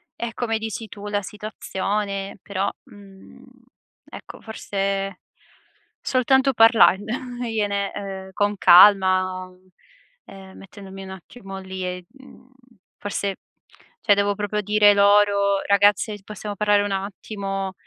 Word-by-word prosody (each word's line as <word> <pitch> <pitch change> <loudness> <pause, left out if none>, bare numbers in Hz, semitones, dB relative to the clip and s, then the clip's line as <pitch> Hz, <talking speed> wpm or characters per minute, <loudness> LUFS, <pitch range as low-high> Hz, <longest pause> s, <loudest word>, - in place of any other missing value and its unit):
è 235 -1 -5
come 225 -2 -2
dici 220 0 -6
tu 205 0 -10
la 205 0 -1
situazione; 200 -1 -4
però, 200 0 -2 0.2
mhmm, 195 -2 -16 0.7
ecco, - - -11
forse 195 -3 -4 0.8
soltanto 265 +1 +2
parlandogliene, 225 -2 +2
uhm, 195 -1 -7
con 205 0 0
calma, 185 0 +5 0.8
ehm, 190 -1 -13
mettendomi 195 0 -11
un 190 - -10
attimo 195 +1 -10
lì 190 0 -7
e 180 0 -5
mhmm, 265 -1 -18 0.5
forse 200 -1 -4 0.6
cioè, 205 - +4
devo 200 0 0
proprio 210 0 -2
dire 210 0 +4
loro: 200 -1 +3
"Ragazze, 205 +1 +3
c 195 - -23
possiamo 210 0 -7
parlare 205 0 +2
un 205 - -3
attimo, 195 0 -4
200 Hz, 115 wpm, -22 LUFS, 195-210 Hz, 0.8 s, calma